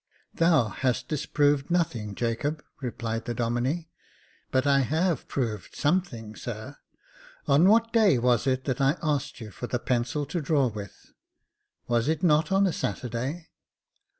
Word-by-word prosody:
"Thou 160 -9 +3
hast 125 +4 -1
disproved 145 -1 +1
nothing, 120 - -1
Jacob," 125 +7 -2 0.2
replied 115 -2 -3
the 120 - -3
Domine. 120 +8 -1 0.3
" - - -34
But 130 +1 +2
I 140 -1 +4
have 160 +4 0
proved 110 -8 -3
something, 145 - -1
sir. 120 +5 -7 0.7
On 145 +5 +5
v/hat 230 +2 +4
day 215 - +5
was 120 +1 +2
it 130 0 +1
that 130 -1 -1
I 135 +5 +3
asked 145 -4 -1
you 110 -3 -8
for 120 - -6
the 120 - -1
pencil 125 +4 -1
to 160 +4 -3
draw 140 -3 +2
with? 100 -3 -10 0.7
"Was 120 0 +1
it 160 +1 0
not 160 +1 +3
on 195 +1 +4
a 185 - +1
Saturday 130 +8 -3
135 Hz, 150 wpm, -27 LUFS, 120-155 Hz, 0.7 s, On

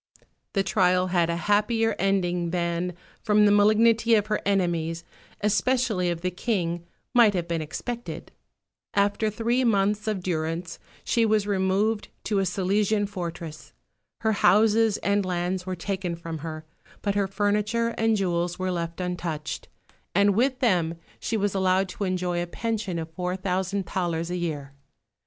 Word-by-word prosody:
The 195 - +2
trial 185 -2 +2
had 170 -2 +3
a 170 - 0
happier 210 +5 +1
ending 180 -3 +1
than, 170 0 -1 0.3
from 210 -1 +4
the 205 - +5
malignity 220 +3 +5
of 210 -2 +2
her - - 0
enemies, 170 -4 0 0.4
especially 210 -2 +1
of 170 -1 -3
the 180 +1 -1
King, 175 -4 -2 0.3
might 230 -5 +6
have 175 -2 -1
been 170 -1 -1
expected. 235 +10 -6 0.6
After 205 +2 +2
three 235 +4 0
months 210 -1 +1
of 205 -4 -1
durance 165 0 -3 0.2
she 235 - +2
was 215 -2 +2
removed 205 +2 +1 0.2
to 205 -2 0
a 195 - +1
Silesian 205 +3 +1
fortress. 170 -5 -7 0.5
Her 220 - +2
houses 215 +2 +4
and 200 0 +2
lands 180 0 -2
were 185 - -2
taken 185 -1 -3
from 165 -1 -6
her; 155 0 -6 0.4
but 200 - +1
her 200 -1 +1
furniture 210 +3 0
and 225 -1 +1
jewels 175 -2 -1
were 185 0 -1
left 170 -1 -3
untouched, 175 -4 -4 0.5
and 200 0 +5
with 250 +5 +2
them 175 -9 +2 0.2
she 225 - -1
was 205 -1 0
allowed 190 0 +2
to 200 - -3
enjoy 180 -2 -1
a 175 - -3
pension 215 -2 -3
of 160 0 -5
four 180 +1 -2
thousand 190 +1 -1
thalers 170 -1 -2
a 180 - -1
year. 150 -5 -4
190 Hz, 155 wpm, -26 LUFS, 175-210 Hz, 0.6 s, might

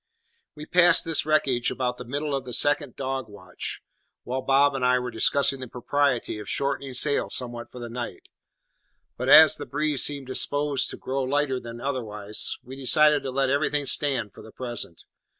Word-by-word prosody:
We 150 0 -9
passed 180 +1 +4
this 160 -2 0
wreckage 135 -6 +1
about 125 -1 -3
the - - -6
middle 145 +4 -3
of 135 -2 -2
the 125 -1 -8
second 145 0 0
dog 130 -3 -4
watch, 105 - -7 0.4
while 130 +2 -3
Bob 140 +2 +3
and 135 -2 -3
I 125 0 +3
were 125 0 -4
discussing 135 +4 +2
the 130 - -7
propriety 125 -2 -1
of 105 - -8
shortening 140 -1 -2
sail 145 +3 +2
somewhat 120 -2 -1
for - - -12
the 120 -1 -6
night; 120 +1 -7 0.9
but 125 +2 -3
as 155 +1 +9
the - - -7
breeze 150 -1 0
seemed 140 -2 +1
disposed 145 +1 0
to - - -7
grow 135 +1 -3
lighter 135 0 0
rather 120 -2 -8
than 115 0 -9
otherwise, 105 -6 -3
we 130 +2 -10
decided 150 +2 +3
to 135 - -5
let 135 0 0
everything 145 0 0
stand 130 -7 -1
for - - -13
the 110 - -13
present. 120 -10 -6
135 Hz, 185 wpm, -25 LUFS, 125-145 Hz, 0.9 s, as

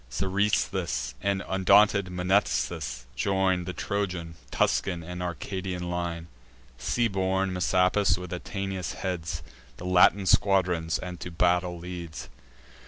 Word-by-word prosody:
Seresthus 95 -7 0
and 100 -1 0
undaunted 100 +1 +4
Mnestheus 90 -9 0
join 95 +2 +1
The 90 - -4
Trojan, 90 -2 -3 0.2
Tuscan, 85 +6 0
and 90 +2 -6
Arcadian 90 +1 -4
line: 85 -1 -3 0.5
Sea 115 - +1
born 95 -1 0
Messapus, 90 +4 +2
with 90 -1 -7
Atinas, 95 -1 -4
heads 90 -4 -3 0.3
The 90 - -8
Latin 90 +2 +5
squadrons, 90 -5 +3
and 90 0 -7
to - - -6
battle 90 +1 +1
leads. 85 -2 -7
90 Hz, 110 wpm, -27 LUFS, 85-95 Hz, 0.5 s, Latin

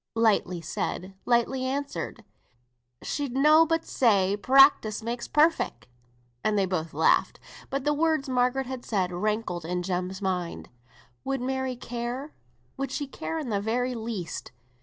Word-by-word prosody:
Lightly 205 -6 +2
said, 180 +3 -4
lightly 245 +2 +2
answered. 280 +2 -3 0.8
"She'd 285 -4 -3
nobbut 320 +3 +5
say, 200 -5 +3
practice 255 -2 +5
makes 235 +1 -3
perfect." 300 - +2 0.6
And 215 -1 +1
they 195 - +3
both 165 -4 -2
laughed. 160 - +3 0.3
But 275 0 -2
the 295 +1 +2
words 310 -2 +1
Margaret 255 +1 +1
had 255 -1 -6
said 190 -5 -1
rankled 180 -2 -2
in 180 +2 -2
Jem's 185 +1 -2
mind. 180 -3 -3 0.5
Would 270 0 -1
Mary 260 0 -2
care? 245 +4 -5 0.4
Would 275 0 -2
she 290 - -3
care 325 +4 -5
in 300 -6 -4
the 200 -2 0
very 245 +4 0
least? 220 -8 -5
240 Hz, 140 wpm, -27 LUFS, 190-270 Hz, 0.8 s, nobbut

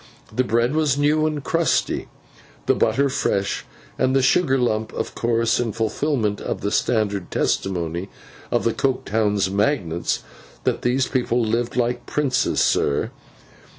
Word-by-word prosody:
The 130 - +3
bread 120 +2 +1
was 150 -3 +2
new 150 +2 +3
and 150 -2 -3
crusty, 165 +4 0 0.6
the - - +4
butter 140 +1 +2
fresh, 100 -7 -1 0.3
and 130 +1 +2
the 135 - +3
sugar 135 +1 +3
lump, 110 -3 0
of - - -4
course—in 115 -1 +1
fulfilment 115 -1 -1
of - - -3
the 100 - -1
standard 100 -5 0
testimony 90 0 -1 0.4
of - - +1
the 115 - +1
Coketown 110 -5 0
magnates, 100 - 0 0.4
that - - 0
these 130 +2 +2
people 125 -2 0
lived 115 +2 -1
like 120 0 -1
princes, 140 -4 +1
sir. 70 - +1
120 Hz, 135 wpm, -22 LUFS, 105-135 Hz, 0.6 s, the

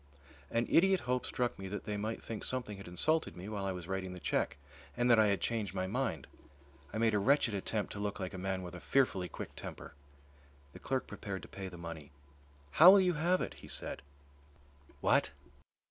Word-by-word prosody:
An 115 +1 +1
idiot 190 +2 +4
hope 125 +1 -1
struck 120 -4 -1
me 95 - -5
that 105 +2 -5
they 105 -1 -3
might 110 +2 -3
think 110 -2 -5
something 120 -6 -1
had 100 - -10
insulted 155 - +1
me 90 +3 -7
while 105 -2 -3
I 95 - 0
was 90 -2 -6
writing 95 -1 -3
the 90 - -8
cheque 80 - -1 0.4
and 120 0 +3
that 115 - +7
I 110 - +6
had 100 -1 +1
changed 110 -5 -2
my 95 0 0
mind. 95 - -2 0.7
I - - -4
made 110 0 +3
a 105 - +3
wretched 130 +1 +3
attempt 100 +1 -2
to 100 - -6
look 105 0 -3
like 95 -2 -4
a 95 - -6
man 95 0 -2
with 90 - -7
a 90 - -7
fearfully 95 -10 +1
quick - - -8
temper. - - -8 0.8
The - - -11
clerk 130 0 -1
prepared 100 -3 -6
to - - -9
pay 95 -1 -7
the 90 -1 -9
money. 85 -4 -8 0.6
"How 165 - +9
will 200 +1 +9
you 180 -2 +3
have 175 +4 +2
it?" - - -3
he - - -13
said. - - -1 1.0
"What?" - - +3
105 Hz, 210 wpm, -33 LUFS, 95-125 Hz, 1.0 s, How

